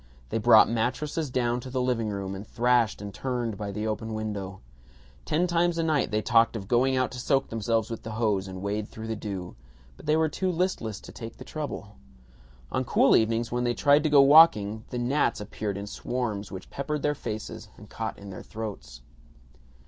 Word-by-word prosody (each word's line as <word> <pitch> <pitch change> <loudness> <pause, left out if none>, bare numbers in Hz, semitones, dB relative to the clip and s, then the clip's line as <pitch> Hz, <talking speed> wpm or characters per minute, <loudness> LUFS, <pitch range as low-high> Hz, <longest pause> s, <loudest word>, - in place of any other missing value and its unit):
They - - -1
brought 110 0 +7
mattresses 130 +7 -1
down 120 -1 0
to 130 - -8
the 130 0 -2
living 125 -3 0
room, 100 -2 -4
and 100 +2 -7
thrashed 120 -3 +2
and 100 -1 -7
turned 120 -4 -2
by 100 -1 -5
the 105 +2 -3
open 110 0 -3
window. 100 -3 -4 0.7
Ten 170 +4 +1
times 175 -1 +1
a 165 - +1
night 155 -3 +1
they 105 0 -1
talked 115 -2 +4
of 100 -3 -5
going 130 +4 +3
out 130 - +1
to 125 - -7
soak 135 +1 +1
themselves 115 0 -1
with 115 - -5
the 110 - -7
hose 105 -4 0
and 95 0 -7
wade 105 +1 -2
through 110 - -9
the 110 0 -3
dew, 100 -4 -6 0.4
but - - -13
they 155 +1 +4
were 160 0 +3
too 185 +5 -1
listless 165 - -1
to - - -11
take 115 -1 -9
the - - -9
trouble. 140 -9 -6 0.7
On - - 0
cool - - +4
evenings, 115 +1 +1
when 120 0 0
they 120 -1 0
tried 145 +4 +4
to 155 - +1
go 145 -1 +7
walking, 135 -8 +6
the 125 - -4
gnats 125 +5 +1
appeared 105 -1 -4
in 100 - -5
swarms 105 -1 -3
which 95 -1 -9
peppered 150 +1 -3
their 150 - +2
faces 110 -4 -6
and 105 - -13
caught 110 +1 -5
in 100 -1 -10
their 95 - -8
throats. 105 - -7
115 Hz, 205 wpm, -27 LUFS, 105-130 Hz, 0.7 s, brought